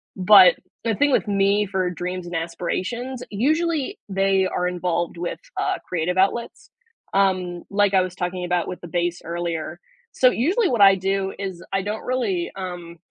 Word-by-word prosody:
But 190 -1 +7 0.3
the 225 -2 0
thing 290 +4 +2
with 250 - +2
me 200 +1 +2
for 185 -2 -1
dreams 180 +1 -5
and 175 -1 -6
aspirations, 190 +10 -3
usually 315 - 0
they 195 -1 +2
are 180 -1 -1
involved 175 -1 -2
with, 175 0 -4 0.2
uh, - - 0
creative 180 +1 -1
outlets, 200 +5 0 0.4
um, 185 -3 +1
like, 205 0 +2
I 185 - +5
was 185 -1 -3
talking 180 0 -3
about 175 -1 0
with 180 - -6
the 175 - -8
bass 175 +1 -2
earlier. 170 0 -4 0.3
So 255 - +5
usually 365 - +1
what 235 -5 0
I 195 -1 +8
do 195 +1 -1
is 190 -3 -6
I 195 - +1
don't 210 +2 -5
really, 345 +8 -1
um 175 -3 -7
190 Hz, 170 wpm, -23 LUFS, 175-210 Hz, 0.4 s, I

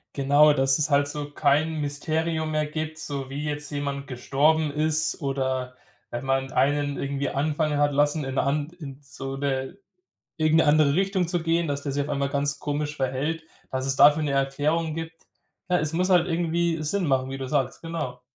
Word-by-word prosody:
Genau, 145 +2 +5
dass 135 0 +2
es 150 +1 +1
halt 145 0 +3
so 145 0 -5
kein 150 +2 +1
Mysterium 155 +2 -1
mehr 155 0 +1
gibt, 155 +1 -5
so 140 -4 -5
wie 140 +2 -4
jetzt 150 -1 -4
jemand 140 -1 -4
gestorben 145 +4 +1
ist 155 +1 0
oder 130 -2 -2 0.3
wenn 120 +1 -5
man 135 0 -1
einen 145 0 +1
irgendwie 140 0 -2
anfangen 150 +1 0
hat 145 0 +3
lassen, 145 +2 +1
in 135 0 -4
'ner - - +2
An 145 +2 0
in 140 -3 -8
so 135 -1 -7
'ne 135 +4 -2 0.6
irgend 155 0 +3
'ne - - +1
andere 145 -1 +4
Richtung 190 0 +1
zu 175 -1 -1
gehen, 165 +1 +1
dass 140 -1 -2
der 140 -1 -3
sich 145 +1 0
auf 145 - -7
einmal 140 -1 -1
ganz 140 0 -1
komisch 150 0 -3
verhält, 140 +5 -2 0.3
dass 130 0 -2
es 135 - 0
dafür 150 +3 +6
'ne 150 - -1
Erklärung 145 +4 0
gibt. 165 +1 -7 0.5
Ne, 180 - +3
es 155 0 -1
muss 180 +3 +1
halt 180 -1 +4
irgendwie 170 -1 0
Sinn 180 +3 0
machen, 130 -1 +1
wie 135 - -5
du 130 - -4
sagst, 135 -2 -1
genau. 150 -7 -5
145 Hz, 195 wpm, -25 LUFS, 140-155 Hz, 0.6 s, dafür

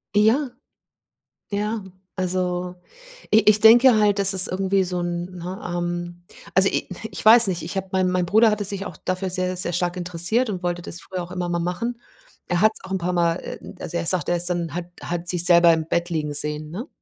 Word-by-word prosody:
Ja. 240 +6 +3 1.0
Ja. 210 +1 -2 0.3
Also, 180 -1 -2 0.6
i 220 - +8
ich 210 0 +4
denke 240 +3 +7
halt, 205 -1 +2
dass 195 0 +2
es 185 -1 +3
irgendwie 190 +1 0
so 180 0 -3
'n, 175 0 -3
ne, 180 +3 -6
ähm 175 0 -4 0.3
Also, 190 +1 +5
i - - -2 0.2
ich - - -6
weiß 225 0 +8
nicht, 175 -3 -2
ich 170 - -6
habe 190 0 -3
meine 185 -1 +1
meine 180 -1 0
Bruder 220 +5 +4
hatte 210 -1 -2
sich 195 0 -5
auch 165 - -8
dafür 185 +1 -3
sehr, 185 0 -1
sehr 175 -1 0
stark 175 +1 -1
interessiert 180 +7 +1
und 185 -3 -4
wollte 175 0 -2
das 170 0 -7
früher 185 -2 -5
auch 175 - -11
immer 180 -1 -3
mal 170 0 -1
machen. 230 +8 -3 0.5
Er 175 +1 0
hat's 215 0 +2
auch 185 - -10
'n 190 - 0
paar 180 +1 -2
mal, 170 -1 +1
äh, - - -7
m - - -11
also, 175 -1 -4
er 170 - -2
sagt, 180 +1 +1
er 175 - +2
ist 175 +1 +1
dann 170 -2 -2
hat 175 -1 -3 0.2
hat 175 0 -4
sich 175 -1 -1
selber 170 -1 +6
im 160 -1 -2
Bett 170 +1 -1
liegen 150 -3 -2
sehen, 150 +1 -2
ne? 230 - -6
180 Hz, 220 wpm, -22 LUFS, 175-195 Hz, 1.0 s, i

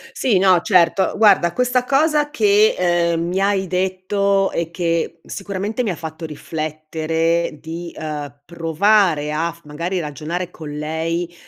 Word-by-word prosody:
Sì, 230 -7 +2
no, 185 -2 +4
certo; 180 0 +3
guarda 195 -6 +5
questa 250 +2 +1
cosa 295 +3 +2
che, 215 -6 +3
ehm, 170 -2 +1
mi 180 +2 -1
hai 195 -1 +1
detto 190 +2 0
e 170 -1 -2
che 170 -1 -1
sicuramente 200 +4 -4
mi 220 - -1
ha 180 - -2
fatto 160 +1 -7
riflettere 160 +2 -2
di, 165 +2 -7
ehm, 145 -3 -6
provare 170 -1 +2
a 165 +2 -1
f 170 - -18
magari 170 +5 -3
ragionare 160 +4 -4
con 155 -4 -9
lei, 160 +3 -3
170 Hz, 140 wpm, -20 LUFS, 160-195 Hz, -, guarda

